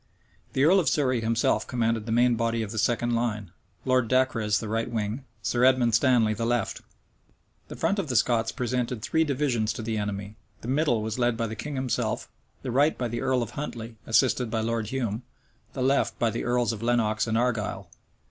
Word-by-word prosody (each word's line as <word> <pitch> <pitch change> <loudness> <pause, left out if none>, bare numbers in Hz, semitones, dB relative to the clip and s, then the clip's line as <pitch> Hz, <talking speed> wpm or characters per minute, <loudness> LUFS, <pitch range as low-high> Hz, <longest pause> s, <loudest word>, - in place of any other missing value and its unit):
The 130 - +2
earl 180 +6 +6
of 160 -7 +2
Surrey 130 -5 +1
himself 115 +1 +1
commanded 115 -2 -1
the - - -2
main 120 +1 +4
body 115 0 0
of 105 - -6
the 110 - -3
second 120 +2 +1
line, 105 -5 -2 0.3
Lord 130 -2 +2
Dacres 115 -4 +2
the 110 - -5
right 115 +2 -1
wing, 115 +3 -3 0.2
Sir 120 0 +1
Edward 130 -3 +4
Stanley 120 -3 +4
the 110 - -4
left. 120 -2 -1 0.9
The - - -8
front 200 - 0
of 195 - -2
the 125 - -1
Scots 115 0 +2
presented 125 -3 -2
three 160 - +2
divisions 130 -7 0
to 115 - -6
the 110 -1 -2
enemy: 105 0 -4 0.2
the - - -8
middle 130 -4 +1
was 110 +2 -3
led 120 -1 +2
by 115 - 0
the 110 0 -5
king 145 +6 -5
himself; 130 -2 -1 0.4
the 125 - -3
right 145 +5 +3
by 120 -2 -2
the 120 +1 -3
earl 130 -2 +1
of 115 - -7
Huntley, 120 -4 -6
assisted 120 +1 +2
by 110 0 -1
Lord 115 -1 -1
Hume; 115 -3 -2 0.5
the 130 - -2
left 130 -3 +1
by 115 -1 +1
the 115 - -3
earls 120 -2 +1
of 110 - -7
Lenox 115 -2 +1
and 110 0 +1
Argyle. 110 -6 -1
120 Hz, 205 wpm, -26 LUFS, 110-130 Hz, 0.9 s, earl